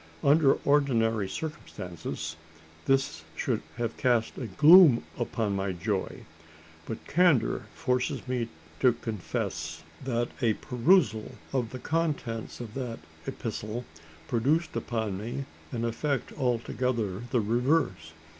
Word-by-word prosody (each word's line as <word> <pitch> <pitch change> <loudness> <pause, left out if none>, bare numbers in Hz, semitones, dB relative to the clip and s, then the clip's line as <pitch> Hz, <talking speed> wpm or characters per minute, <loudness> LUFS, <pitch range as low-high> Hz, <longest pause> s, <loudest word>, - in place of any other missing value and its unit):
Under 140 0 +6
ordinary 115 -8 +3
circumstances, 90 - -5 0.5
this 135 - +1
should - - -1 0.2
have 115 -2 -2
cast 120 -3 +2
a 125 - -3
gloom 150 - +8 0.2
upon 110 -4 -1
my 95 -1 -1
joy; 95 +2 -3 0.6
but 110 - -6
candour 140 - +3
forces 125 +2 -1
me 125 -2 -1 0.3
to 125 -2 +5
confess 110 -8 -4 0.2
that 120 -2 0
a 115 -3 +4
perusal 125 - +2 0.2
of 125 -4 0
the 130 - -6
contents 145 -7 -2
of 115 -3 -7
that 125 -4 -4 0.3
epistle 110 +3 -4 0.4
produced 140 +8 +1
upon 110 -5 -2
me 120 +6 -4 0.3
an 115 -3 -2
effect 135 +3 -1
altogether 120 -5 -1
the 125 - +2
reverse. 115 - +1
120 Hz, 115 wpm, -28 LUFS, 110-135 Hz, 0.6 s, gloom